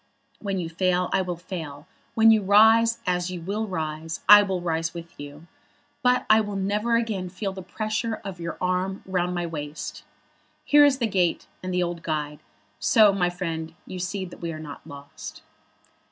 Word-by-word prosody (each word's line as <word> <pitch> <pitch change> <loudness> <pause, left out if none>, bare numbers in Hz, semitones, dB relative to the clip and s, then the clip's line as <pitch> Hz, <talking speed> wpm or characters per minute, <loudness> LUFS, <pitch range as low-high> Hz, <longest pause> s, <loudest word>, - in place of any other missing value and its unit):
When 200 -2 -3
you 175 -3 -2
fail 180 +2 0
I 195 - +3
will 180 -2 -3
fail. 165 -5 -7 0.3
When 225 0 +7
you 220 -1 +4
rise, 220 +3 +5
as 180 -1 0
you 180 -1 -5
will 205 +6 -3
rise, 160 -3 -4
I 205 +1 +10
will 190 -2 -1
rise 165 -1 -2
with 170 0 -8
you. 145 +2 -10 0.6
But 250 0 +2
I 215 +1 +6
will 205 -1 -4
never 210 +4 0
again 215 -6 -1
feel 195 +2 -4
the 190 - -7
pressure 215 +4 -3
of 190 -3 -6
your 170 0 -5
arm 185 +1 -1
round 180 -1 -1
my 175 0 -1
waist. 150 -2 -6 0.6
Here 290 0 +7
is 280 -2 +3
the 245 - 0
gate, 185 -5 0 0.2
and 185 - -4
the 180 0 +1
old 170 -1 -4
guide. 150 -2 -3 0.4
So, 215 -3 +5
my 180 -2 +1
friend, 165 -3 -5
you 185 - -7
see 185 +2 -3
that 175 - -12
we 170 -1 -3
are 155 - -6
not 150 -2 -9
lost." 140 -2 -10
180 Hz, 185 wpm, -25 LUFS, 165-205 Hz, 0.6 s, I